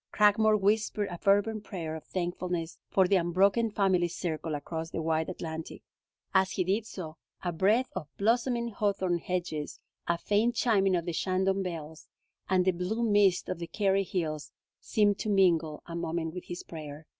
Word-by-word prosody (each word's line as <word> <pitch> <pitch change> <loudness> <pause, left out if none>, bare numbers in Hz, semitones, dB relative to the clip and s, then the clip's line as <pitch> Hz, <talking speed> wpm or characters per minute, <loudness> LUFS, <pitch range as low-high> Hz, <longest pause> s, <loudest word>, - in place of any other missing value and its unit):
Cragmore 215 +1 +4
whispered 210 0 +1
a 175 - -6
fervent 205 +1 +2
prayer 165 -6 -5
of 160 - -8
thankfulness 175 -2 -3
for 190 -2 +4
the 195 +1 +4
unbroken 195 +6 +3
family 190 -4 +2
circle 165 -2 -3
across 160 +3 -5
the - - -4
wide 160 0 0
Atlantic. 160 -3 -6 0.5
As 190 -1 +3
he 185 - +1
did 205 +5 0
so, 160 -6 -7 0.3
a 175 - 0
breath 210 +9 +2
of 150 - -4
blossoming 235 +2 +1
hawthorn 195 -4 0
hedges, 170 -4 -3 0.3
a 170 - +2
faint 210 +6 +1
chiming 195 -5 +3
of 170 -1 -1
the 175 - -2
Shandon 190 +3 +1
bells, 160 -4 -6 0.4
and 185 -1 +3
the 190 - +4
blue 185 +6 -2
mists 205 -4 +3
of 180 - -3
the 170 - -5
Kerry 195 +2 +1
hills 155 -5 -3 0.3
seemed 205 -2 +2
to 215 - -2
mingle 170 -6 +2
a 170 - -7
moment 165 -1 -2
with 180 - -7
his 175 0 -6
prayer. 155 -1 -9
185 Hz, 170 wpm, -29 LUFS, 165-205 Hz, 0.5 s, Cragmore